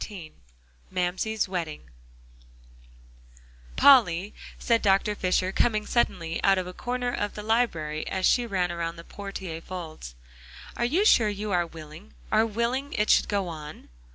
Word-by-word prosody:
XIV 180 -7 -9 0.6
MAMSIE'S 190 +4 -1
WEDDING 165 - -5 1.8
"Polly," 210 -8 +5 0.2
said 230 -1 +1
Dr. 200 +1 +2
Fisher, 185 -1 0
coming 215 0 +1
suddenly 170 -8 -1
out 195 -1 +4
of 185 - -1
a 180 - -8
corner 245 +3 -3
of 205 - -3
the 210 - -6
library 170 -10 0
as 190 -1 -1
she 245 -1 +3
ran 185 -4 0
around 170 -1 -3
the 165 - -11
portiere 190 -4 -7
folds, 160 - -8 0.7
"you 310 +12 +2
are - - -1
sure 225 - +5
you 205 0 -4
are 175 -2 +1
willing 160 +4 -12 0.2
are 220 +1 +3
willing 235 +6 -2
it 210 0 +2
should - - +4
go 200 -3 -1
on?" 155 -2 -9
195 Hz, 150 wpm, -26 LUFS, 170-220 Hz, 1.8 s, Polly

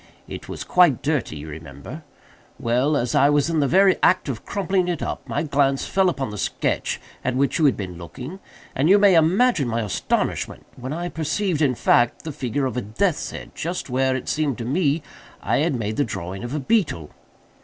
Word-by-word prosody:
It - - -8
was - - -5
quite 175 -8 +4
dirty, 145 - -1
you 75 +1 -8
remember. 75 -3 -9 0.6
Well, 125 +6 +1
as 120 -3 -1
I 140 - +5
was 145 +2 +2
in 160 - +1
the 140 - +2
very 190 +4 +5
act 185 -5 +3
of 120 -5 -4
crumpling 190 -2 0
it 175 -4 -2
up, - - -5
my 145 - -1
glance 140 -2 +1
fell 190 -1 +2
upon 135 -9 -3
the 105 - -6
sketch - - -1 0.2
at 125 - -1
which 140 +6 +1
you 160 - +4
had 140 - +3
been 90 -4 -6
looking, 130 - -8 0.4
and 145 +5 +2
you 200 - +8
may 200 -2 +6
imagine 170 - +3
my 115 0 -1
astonishment 105 -3 -2
when 130 +1 -6
I 170 +3 -3
perceived, 160 +2 -1
in 135 -4 +3
fact, 120 +1 +2
the 160 - -4
figure 135 0 -2
of 130 -1 -3
a - - 0
death's 150 - -1
head - - -8
just 170 -4 -4
where, 130 +1 +2
it 130 - -5
seemed 150 -5 0
to 115 - -5
me, 150 +2 +1 0.4
I - - 0
had 155 0 +1
made 110 -2 -3
the 145 - +3
drawing 95 -2 -5
of 120 - -5
the 150 - -1
beetle. 145 - 0
140 Hz, 210 wpm, -23 LUFS, 120-170 Hz, 0.6 s, you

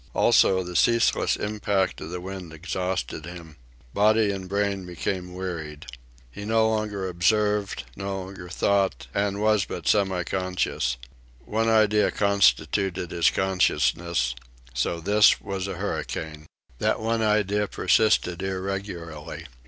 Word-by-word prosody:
Also, 95 -1 +4
the 90 0 -8
ceaseless 115 +3 +3
impact 105 -2 -1
of 80 - -6
the 90 +1 -5
wind 95 -2 -7
exhausted 90 -3 -3
him. 85 -3 -10 0.4
Body 105 0 +3
and 95 -2 -6
brain 100 -1 0
became 90 +1 -4
wearied. 80 -5 -5 0.5
He 100 - -8
no 110 +1 +2
longer 105 -3 -1
observed, 105 +3 +1
no 95 0 -4
longer 95 -2 -9
thought, 95 -5 +1
and 100 0 0
was 105 -2 +3
but - - -6
semiconscious. 95 - 0 0.5
One 110 +1 0
idea 110 -1 +4
constituted 95 -1 +1
his 85 - +3
consciousness: 85 -6 +1 0.4
SO 85 +7 -1
THIS 105 +4 +5
WAS 95 -1 -4
A 95 - -4
HURRICANE. 80 -1 -4 0.3
That - - +1
one 115 +1 0
idea 105 -1 +1
persisted 95 -6 +2
irregularly. 95 -5 -5
95 Hz, 120 wpm, -25 LUFS, 85-105 Hz, 0.5 s, THIS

